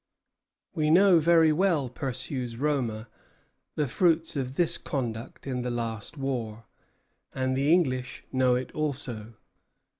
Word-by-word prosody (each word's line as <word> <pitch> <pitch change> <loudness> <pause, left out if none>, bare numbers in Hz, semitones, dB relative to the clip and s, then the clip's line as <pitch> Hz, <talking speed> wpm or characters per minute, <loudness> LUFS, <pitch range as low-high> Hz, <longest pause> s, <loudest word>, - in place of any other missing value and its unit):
"We 155 -4 0
know 180 +1 +6
very 165 0 +5
well," 165 -4 +2
pursues 125 -1 -4
Roma, 125 -6 -1 0.7
"the 150 - 0
fruits 165 +4 +1
of 130 -1 -3
this 170 0 +2
conduct 120 -3 -5
in 130 -2 -2
the 125 - -3
last 115 +2 -4
war; 115 -5 -4 0.7
and 130 -1 0
the 140 +3 +2
English 130 -8 +1
know 130 -1 +3
it 125 0 -3
also. 125 -7 -4
130 Hz, 125 wpm, -27 LUFS, 120-155 Hz, 0.7 s, know